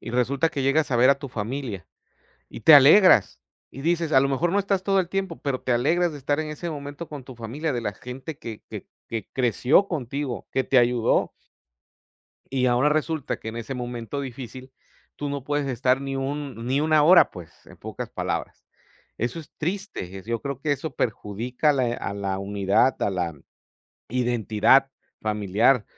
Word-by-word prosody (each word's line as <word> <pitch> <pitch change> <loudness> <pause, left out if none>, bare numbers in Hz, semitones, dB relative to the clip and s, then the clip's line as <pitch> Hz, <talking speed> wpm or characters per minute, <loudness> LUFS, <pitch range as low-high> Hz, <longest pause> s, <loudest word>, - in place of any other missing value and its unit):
Y - - -7
resulta 130 +6 +1
que 140 - -3
llegas 140 +2 +2
a 125 - +2
ver 125 +3 +6
a 140 - +2
tu 140 - -7
familia, 115 - -5 0.6
y - - -10
te 160 - +8
alegras, 140 - +7 0.3
y 135 - -10
dices 165 0 0
a 135 - +6
lo 135 - +2
mejor 160 +6 0
no 200 - +2
estás 195 -1 0
todo 195 -1 +2
el 175 - -1
tiempo, 190 -3 -3
pero 135 -3 -2
te 130 - -2
alegras 160 +8 +2
de 145 - -8
estar 145 +2 -1
en 155 -1 -3
ese 160 +3 -5
momento 145 +1 -7
con 145 -4 -8
tu 130 0 -11
familia, 125 +8 -4
de 120 - -2
la 105 -2 -3
gente 130 +6 -8
que 115 -7 -8
que - - -7 0.2
que 115 -3 -5
creció 130 - +3
contigo, 135 - -4
que 130 - +1
te 135 - +3
ayudó. 120 -1 +2 1.2
Y 130 -1 +1
ahora 125 +3 +3
resulta 155 -1 -1
que 110 - -7
en 115 - -6
ese 115 +3 -5
momento 120 +2 -5
difícil, 130 0 -8 0.4
tú 145 - -4
no 140 -2 -4
puedes 145 0 -1
estar 130 0 +1
ni 135 0 -4
un 135 -3 -4
ni 135 +3 +1
una 155 -1 +4
hora, 175 +4 +7
pues, 85 -3 -11
en - - -15
pocas - - -7
palabras. - - -4 0.5
Eso 120 +7 -2
es 155 - -15
triste, 175 - -4
es 95 +1 -10
yo 115 -1 -2
creo 140 -2 -5
que 150 0 0
eso 145 0 -4
perjudica 120 +7 -1
a - - +4
le 125 -4 0
a 100 - -5
la 100 -1 -3
unidad, 100 +5 +1
a - - +1
la 90 -3 -2 0.7
identidad 120 +2 +3 0.3
familiar. 105 +3 +2
130 Hz, 190 wpm, -24 LUFS, 115-150 Hz, 1.2 s, te